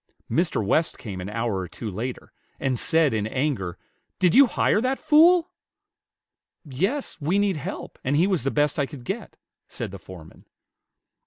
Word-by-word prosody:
Mr. 160 - +1
West 155 +11 +1
came 95 -5 -7
an 95 - -5
hour 110 -2 -2
or 90 - -4
two 115 - -8
later, 120 +6 -5 0.3
and 130 -3 -1
said, 160 -6 +3
in 105 -1 -1
anger, 120 - -2 0.4
"Did 180 -3 +3
you 275 0 +8
hire 215 - +2
that 260 +2 0
fool?" 330 +3 +5 1.1
"Yes; 190 - -2
we 165 +7 +1
need 200 -4 +1
help, 145 - -7
and 135 +3 0
he 165 +5 +4
was 190 -4 +1
the 135 - 0
best 150 +1 +1
I 140 - +1
could 140 -5 -10
get," - - -5 0.3
said - - -6
the 100 - -9
foreman. 85 -3 -13
145 Hz, 170 wpm, -24 LUFS, 110-185 Hz, 1.1 s, you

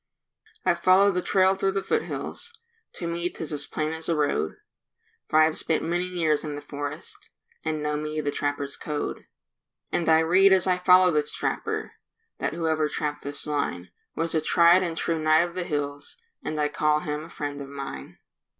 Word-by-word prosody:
I - - +5
follow 185 +3 +5
the 180 -1 -1
trail 190 0 +3
through 195 0 0
the 195 0 -1
foothills, 460 +1 -3 0.4
To 175 - -6
me 170 +1 -2
'tis 160 -3 -6
as 145 0 -2
plain 155 +1 -2
as 160 +1 -6
a 165 - +2
road, 145 - 0 0.7
For 155 - +1
I've 155 0 +4
spent 160 - 0
many 175 +2 -1
years 165 -5 0
in 150 -2 -4
the 145 - -6
forest 145 0 -7 0.3
And 155 -1 -2
know 150 0 0
me 155 +1 -3
the 145 -1 -1
trappers' 145 -1 -2
code. 150 -1 -4 0.6
And 170 -2 0
I 160 0 +6
read 190 +4 +5
as 190 -2 +3
I 180 -1 +2
follow 180 0 +6
this 150 -1 +1
trapper, - - -2 0.5
That - - -1
whoever 160 -2 0
trapped 150 -1 -3
this 145 0 -5
line 90 - -2 0.2
Was 165 0 -1
a 160 - +2
tried 170 +3 +5
and 170 -3 -3
true 165 -1 0
knight 155 +1 +5
of 170 - -11
the 180 -1 -3
hills, 145 -2 -4 0.3
And 155 0 -3
I 150 - +2
call 150 0 +1
him 150 +1 -4
a - - -13
friend 145 -3 -5
of 135 - -8
mine. 135 - -7
155 Hz, 190 wpm, -26 LUFS, 150-175 Hz, 0.7 s, I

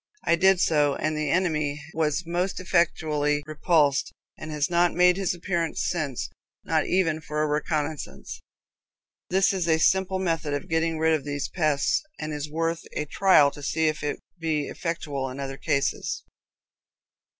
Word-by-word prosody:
I 170 - +4
did 190 +1 +4
so, 150 -5 +3
and 155 0 -1
the 150 -1 -1
enemy 155 -4 0
was 160 +1 0
most 175 +3 -1
effectually 155 -5 +1
repulsed, 150 -2 +2 0.2
and 155 - -8
has 150 -1 0
not 175 0 +2
made 180 0 +5
his 190 -2 -1
appearance 170 -2 -2
since 150 -8 -2 0.4
not - - 0
even 165 -4 +1
for 150 0 -2
a - - +1
reconnoissance!" 150 0 -3 0.9
This 190 +2 +3
is 180 -3 -1
a 160 -1 +4
simple 190 +3 +2
method 165 -5 -1
of 145 - -5
getting 165 0 +1
rid 160 +1 +3
of 155 -3 0
these 145 0 -3
pests, 155 -5 +1 0.2
and 155 0 -4
is 150 0 -4
worth 165 +2 -1
a 150 - -2
trial 150 -3 +4
to 145 - -11
see 160 +2 +1
if 155 - -4
it 145 0 -2 0.2
be 155 -3 -1
effectual 145 -5 -3
in 130 +2 -8
other 135 -1 -5
cases. 140 -3 -1
155 Hz, 160 wpm, -26 LUFS, 150-170 Hz, 0.9 s, made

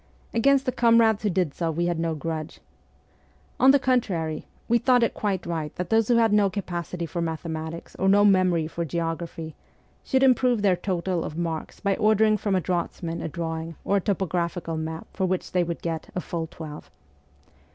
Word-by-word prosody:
Against 270 +3 +3
the 255 - +1
comrades 230 -3 +4
who 210 - +1
did 175 -5 0
so 170 -2 -2
we 170 +2 -1
had 175 -1 -1
no 165 -1 -1
grudge. 155 0 -5 1.0
On 260 - +6
the 280 - +7
contrary, 190 - -1 0.2
we 235 +1 +3
thought 250 0 +4
it 230 - +1
quite 195 -4 -2
right 160 -3 -3
that 180 -1 -4
those 225 -1 +3
who 240 - +4
had 225 -2 +4
no 205 -1 +4
capacity 175 -3 -4
for 170 +1 -4
mathematics 160 0 -5
or 190 - +3
no 205 +1 +5
memory 185 -5 +3
for 170 +2 -4
geo 165 +1 -1
graphy, 165 -1 -7 0.5
should 265 -1 +1
improve 250 -4 +3
their 190 -3 +4
total 180 -1 -2
of 155 - -6
marks 165 -2 -4
by 200 -1 +1
ordering 215 0 +4
from 205 -1 0
a 185 - +2
draughtsman 170 -1 -3
a - - -3
drawing 165 0 -4
or 200 - +2
a - - 0
topographical 175 -3 -1
map 160 0 -4
for 190 -2 0
which 185 0 -2
they 180 -1 +2
would 170 0 -5
get 165 -2 -3
' - - -29
a - - 0
full 170 -2 -4
twelve.' 155 -2 -9
175 Hz, 195 wpm, -25 LUFS, 165-210 Hz, 1.0 s, the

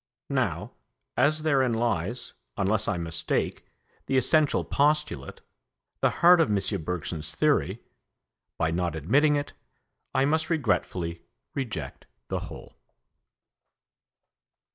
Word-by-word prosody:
Now, - - -1 0.4
as 155 +2 +2
therein 135 -6 +3
lies, 115 -1 -1 0.2
unless 105 +2 +1
I 90 - 0
mistake, 80 -1 -2 0.4
the 135 - +2
essential 150 +4 +3
postulate, 145 - 0 0.6
the - - +4 0.2
heart 175 -1 +8
of 160 - +2
M. 100 -2 0
Bergson's 80 -2 -3
theory, - - +1 0.7
by 80 0 +1
not 85 -1 -1
admitting 140 - +3
it 145 0 -3 0.6
I 130 +1 +4
must 160 +3 +1
regretfully 95 - -1 0.3
reject 130 -5 -5 0.2
the - - -1
whole. - - -12
115 Hz, 105 wpm, -27 LUFS, -, 0.7 s, heart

